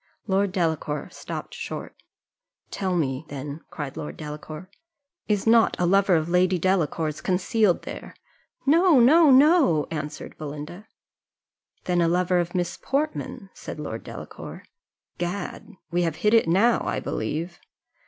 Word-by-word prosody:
Lord 195 Hz, -1 st, +1 dB
Delacour 160 Hz, -5 st, -1 dB
stopped -, -, -7 dB
short. -, -, -6 dB, 0.8 s
"Tell 185 Hz, -2 st, -1 dB
me, 135 Hz, -3 st, -1 dB
then," 145 Hz, +2 st, -6 dB
cried 145 Hz, -4 st, -6 dB
Lord 150 Hz, -, -6 dB
Delacour, 155 Hz, +2 st, -8 dB, 0.6 s
"is 205 Hz, -2 st, 0 dB
not 225 Hz, -1 st, +5 dB
a 180 Hz, -, +2 dB
lover 195 Hz, +1 st, +4 dB
of 160 Hz, -1 st, +1 dB
Lady 180 Hz, +1 st, +3 dB
Delacour's 160 Hz, -4 st, 0 dB
concealed 190 Hz, +2 st, +1 dB
there?" -, -, -8 dB, 0.5 s
"No! 325 Hz, +1 st, +5 dB
No! 305 Hz, +6 st, +6 dB
No!" 270 Hz, -, +5 dB
answered 150 Hz, -1 st, -5 dB
Belinda. 150 Hz, +7 st, -7 dB, 1.0 s
"Then 175 Hz, -1 st, +1 dB
a 170 Hz, -, +3 dB
lover 180 Hz, +1 st, +2 dB
of 175 Hz, +1 st, -3 dB
Miss 175 Hz, -1 st, -2 dB
Portman?" 275 Hz, -7 st, -3 dB
said -, -, -8 dB
Lord 115 Hz, -7 st, -5 dB
Delacour. -, -, -9 dB, 0.6 s
"Gad! 175 Hz, +2 st, -5 dB, 0.2 s
we 175 Hz, +1 st, +1 dB
have 165 Hz, -3 st, 0 dB
hit 210 Hz, +6 st, +1 dB
it 225 Hz, -6 st, +5 dB
now, 205 Hz, +8 st, +3 dB
I -, -, -1 dB
believe." 160 Hz, +10 st, -4 dB
175 Hz, 135 wpm, -25 LUFS, 155-205 Hz, 1.0 s, No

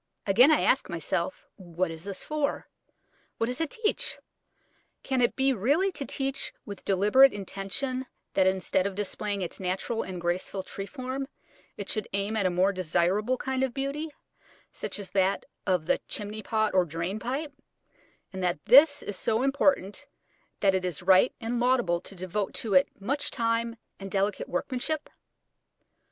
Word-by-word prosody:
Again 230 Hz, +8 st, +6 dB
I 310 Hz, -, +4 dB
ask 265 Hz, -, +2 dB
myself, 170 Hz, +1 st, -2 dB
What 180 Hz, -2 st, -2 dB
is 160 Hz, +2 st, -7 dB
this 200 Hz, -1 st, -4 dB
for? 300 Hz, -2 st, -2 dB, 0.7 s
What 230 Hz, -, +1 dB
does 250 Hz, +5 st, -2 dB
it 325 Hz, -, 0 dB
teach? 435 Hz, +4 st, -1 dB, 0.9 s
Can 265 Hz, -2 st, 0 dB
it 240 Hz, -, +2 dB
be 270 Hz, 0 st, +3 dB
really 285 Hz, -, +2 dB
to 280 Hz, -, -5 dB
teach 270 Hz, 0 st, -1 dB
with 200 Hz, -1 st, -8 dB
deliberate 210 Hz, +8 st, +5 dB
intention 205 Hz, +7 st, -3 dB, 0.3 s
that 190 Hz, -1 st, +4 dB
instead 190 Hz, 0 st, +1 dB
of 195 Hz, -, -5 dB
displaying 205 Hz, 0 st, -2 dB
its 175 Hz, -, -6 dB
natural 190 Hz, +5 st, -2 dB
and 185 Hz, -1 st, -5 dB
graceful 175 Hz, +2 st, -2 dB
tree 195 Hz, +1 st, -6 dB
form 260 Hz, +1 st, -4 dB, 0.5 s
it 200 Hz, -, -5 dB
should 215 Hz, -, -2 dB
aim 200 Hz, +2 st, 0 dB
at 200 Hz, -4 st, +2 dB
a -, -, +2 dB
more 185 Hz, +3 st, +2 dB
desirable 185 Hz, +7 st, +1 dB
kind 265 Hz, 0 st, -2 dB
of 265 Hz, -1 st, 0 dB
beauty, 280 Hz, +3 st, -2 dB, 0.6 s
such -, -, -4 dB
as 200 Hz, -2 st, -8 dB
that 195 Hz, 0 st, +1 dB, 0.2 s
of 180 Hz, -4 st, +2 dB
the -, -, +1 dB
chimney 210 Hz, +1 st, -4 dB
pot 215 Hz, -1 st, 0 dB
or 185 Hz, -1 st, +5 dB
drain 170 Hz, +5 st, -3 dB
pipe, 275 Hz, +6 st, -3 dB, 0.8 s
and 190 Hz, -, -5 dB
that 175 Hz, -3 st, +1 dB
this 285 Hz, +4 st, +7 dB
is 205 Hz, -, -4 dB
so 225 Hz, +5 st, 0 dB
important 275 Hz, -7 st, +1 dB, 0.5 s
that 195 Hz, -2 st, +4 dB
it 190 Hz, -1 st, 0 dB
is 180 Hz, -3 st, -3 dB
right 190 Hz, +5 st, +6 dB
and 235 Hz, +1 st, -2 dB
laudable 240 Hz, -9 st, +2 dB
to 195 Hz, -, -10 dB
devote 185 Hz, +2 st, -3 dB
to 220 Hz, -3 st, -2 dB
it 185 Hz, 0 st, +5 dB
much 275 Hz, +9 st, -1 dB
time 230 Hz, -1 st, 0 dB, 0.2 s
and 195 Hz, 0 st, -6 dB
delicate 195 Hz, +1 st, -1 dB
workmanship? 255 Hz, -, -2 dB
205 Hz, 165 wpm, -28 LUFS, 185-260 Hz, 0.9 s, this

